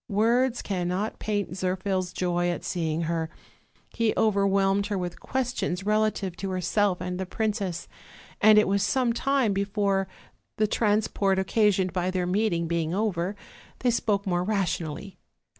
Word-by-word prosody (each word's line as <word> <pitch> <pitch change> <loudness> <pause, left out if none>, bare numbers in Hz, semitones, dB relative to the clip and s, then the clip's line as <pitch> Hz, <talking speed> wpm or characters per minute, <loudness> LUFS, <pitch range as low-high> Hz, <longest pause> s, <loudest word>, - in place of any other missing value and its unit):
Words 235 +4 +2
cannot 185 +2 -2
paint 205 -2 -2
Zirphil's 185 0 -1
joy 175 -1 0
at 175 - -3
seeing 165 -2 -1
her; 165 -1 -1 0.6
he 230 -2 +1
overwhelmed 200 -1 +2
her 205 -2 -2
with 180 -1 -4
questions 245 -8 -2
relative 210 -3 +1
to 195 - -4
herself 185 +1 +1
and 180 0 -3
the 190 - -3
princess; 200 -4 -2 0.5
and 215 0 +7
it 210 - +5
was 200 +1 +1
some 250 0 +1
time 265 -3 +1
before, 200 -1 0 0.5
the 215 - +3
transport 205 -2 +1
occasioned 190 -2 +2
by 180 0 0
their 185 -1 -1
meeting 180 -3 0
being 165 0 -1
over, 195 -2 -1 0.5
they 250 - +3
spoke 210 -3 0
more 175 -2 0
rationally. 190 -3 -2
195 Hz, 140 wpm, -26 LUFS, 180-215 Hz, 0.6 s, and